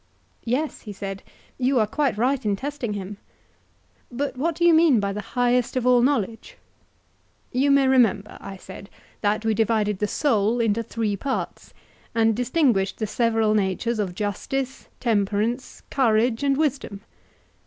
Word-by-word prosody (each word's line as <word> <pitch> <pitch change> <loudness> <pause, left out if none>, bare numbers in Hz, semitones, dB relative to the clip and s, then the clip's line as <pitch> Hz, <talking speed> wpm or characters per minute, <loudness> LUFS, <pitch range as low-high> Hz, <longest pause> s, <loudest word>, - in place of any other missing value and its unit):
Yes, 265 +6 -1
he 210 - -8
said, 195 -1 -6 0.4
you 260 +1 +2
are 215 - +3
quite 270 +1 -1
right 255 +3 +1
in 205 -1 +1
testing 270 -2 -4
him. 200 0 -6 0.9
But 275 +4 -3
what 315 +5 -1
do 345 - +1
you 340 - +6
mean 315 -7 +5
by 200 -1 -1
the 210 - -4
highest 245 +3 0
of 250 - -1
all 250 -1 +5
knowledge? 230 -4 -1 0.9
You 270 +3 +2
may 280 -1 +4
remember, 230 -6 +2
I 195 - -8
said, 190 +2 -11 0.3
that 215 +1 0
we 220 - +2
divided 215 -2 +1
the 210 - 0
soul 225 -3 +1
into 225 -1 +1
three 225 -2 -2
parts; 265 +7 -4 0.4
and 225 -1 +3
distinguished 245 - +1
the 220 - -2
several 225 0 +1
natures 215 +3 0
of 185 -4 -2
justice, 250 +6 -3
temperance, 220 +2 -1
courage, 230 -2 +2
and 275 -1 +2
wisdom? 280 -9 -1
230 Hz, 155 wpm, -24 LUFS, 210-265 Hz, 0.9 s, you